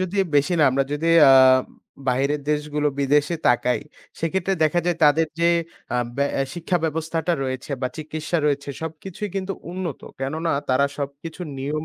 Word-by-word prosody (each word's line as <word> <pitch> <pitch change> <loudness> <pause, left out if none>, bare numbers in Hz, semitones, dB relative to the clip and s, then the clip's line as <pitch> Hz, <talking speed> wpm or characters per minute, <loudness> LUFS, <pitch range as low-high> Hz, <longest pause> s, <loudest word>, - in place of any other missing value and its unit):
যদি 185 +1 -2 0.2
বেশি 145 +6 +2
না, - - +5
আমরা 135 +1 +1
যদি 160 +3 -1 0.2
আ 135 - +8 0.8
বাইরের 140 +3 +1
দেশগুলো, 150 0 0
বিদেশে 145 +4 +2
তাকাই, 125 0 +2 0.4
সেক্ষেত্রে 190 +3 0
দেখা 165 +3 +2
যায় 175 -2 +1
তাদের 155 +2 +4
যে 170 - +4 0.5
আ - - +2 0.2
ব্যা 140 0 +2
এ - - +3
শিক্ষা 175 +1 -1
ব্যবস্থাটা 160 +1 -1
রয়েছে 130 +2 -5
বা 130 - +1
চিকিৎসা 155 +2 -3
রয়েছে, 145 -1 -1
সবকিছুই 160 +6 -6
কিন্তু 195 0 -2 0.2
উন্নত, 180 -5 -4 0.2
কেননা 160 +5 -1 0.2
তারা 135 +2 +3
সবকিছু 140 +4 -6 0.2
নিয়ম 150 +3 -3
155 Hz, 155 wpm, -23 LUFS, 140-170 Hz, 0.8 s, আ